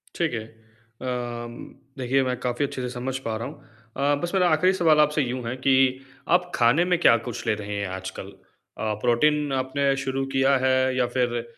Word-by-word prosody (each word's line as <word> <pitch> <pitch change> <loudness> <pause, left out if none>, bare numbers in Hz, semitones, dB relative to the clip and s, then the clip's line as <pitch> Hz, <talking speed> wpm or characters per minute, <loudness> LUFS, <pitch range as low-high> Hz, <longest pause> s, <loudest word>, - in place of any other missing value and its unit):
ठीक 170 -5 0
है, 110 -2 -3 0.7
अम, 120 -1 -4 0.4
देखिए 130 +1 +1
मैं 125 -1 -1
काफ़ी 125 +3 -1
अच्छे 135 -2 -5
से 125 - -3
समझ 125 +1 -4
पा 110 - -1
रहा 115 - -4
हूँ। - - -12 0.3
अ, 145 +1 +2
बस 175 - -3
मेरा 180 -2 +3
आखरी 180 +4 +3
सवाल 165 -5 +3
आपसे 150 0 +3
यूँ 125 -1 -3
है 120 - -3
कि 135 -1 +5 0.6
आप 180 0 0
खाने 125 +9 +4
में 180 -1 +2
क्या 115 - +6
कुछ 120 - -5
ले - - +3
रहे 105 -1 -6
हैं 100 -1 -2
आजकल? 95 0 -6 0.5
अ, 110 -1 -1
प्रोटीन 145 +4 +2
आपने 135 +1 0
शुरू 135 0 -2
किया 135 +1 +3
है 130 0 +2
या 125 - +3
फिर 120 -2 0
130 Hz, 195 wpm, -24 LUFS, 120-145 Hz, 0.7 s, क्या